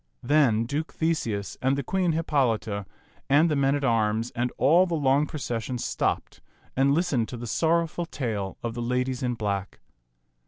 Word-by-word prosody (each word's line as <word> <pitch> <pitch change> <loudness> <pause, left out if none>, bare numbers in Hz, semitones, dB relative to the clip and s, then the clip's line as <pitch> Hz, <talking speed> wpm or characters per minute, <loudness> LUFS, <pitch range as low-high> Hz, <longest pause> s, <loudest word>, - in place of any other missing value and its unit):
Then 130 -7 +3
Duke 145 +6 -3
Theseus 115 - -1
and 135 +2 +2
the 140 - -2
Queen 180 +3 0
Hippolita 115 -10 0 0.4
and 155 +4 +4
the - - +2
men 140 0 +2
at 145 - -2
arms 115 -1 +1
and 120 +1 -1
all 170 +8 +5
the 170 - -1
long 145 0 +2
procession 125 -4 -3
stopped - - -2 0.3
and 135 +1 +3
listened 150 -10 0
to 125 - -6
the 120 - -6
sorrowful 165 +6 0
tale 105 - -3
of 115 -1 -2
the 120 - -4
ladies 125 +1 -1
in 125 -1 -1
black. 100 -3 -3
130 Hz, 165 wpm, -26 LUFS, 115-150 Hz, 0.4 s, all